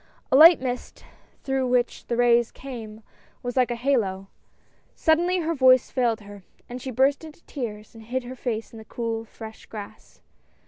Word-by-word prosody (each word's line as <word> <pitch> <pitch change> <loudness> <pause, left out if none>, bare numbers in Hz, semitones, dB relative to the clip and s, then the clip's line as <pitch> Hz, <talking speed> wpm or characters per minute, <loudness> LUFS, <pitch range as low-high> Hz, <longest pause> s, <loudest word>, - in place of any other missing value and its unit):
A - - +4
light 325 +4 +9
mist, 250 -1 -5 0.4
through 265 -1 0
which 245 -1 0
the 235 - -1
rays 240 -1 +4
came, 225 -5 -9 0.4
was 245 0 -4
like 255 -2 +3
a 240 - -2
halo. 215 -7 -1 0.7
Sud 320 0 +3
denly 355 -1 0
her 335 - 0
voice 260 -3 +4
failed 235 -4 0
her, 205 -1 -12 0.4
she 260 - -6
burst 265 +5 +2
into 315 +1 -13
tears, 215 -6 -6
and 225 -1 -13
hid 255 +2 -3
her 250 +1 -8
face 230 -3 -4
in 225 - -9
the 220 - -12
cool, 225 0 -4
fresh 220 0 -11
grass. 210 -2 -10
245 Hz, 175 wpm, -25 LUFS, 225-265 Hz, 0.7 s, light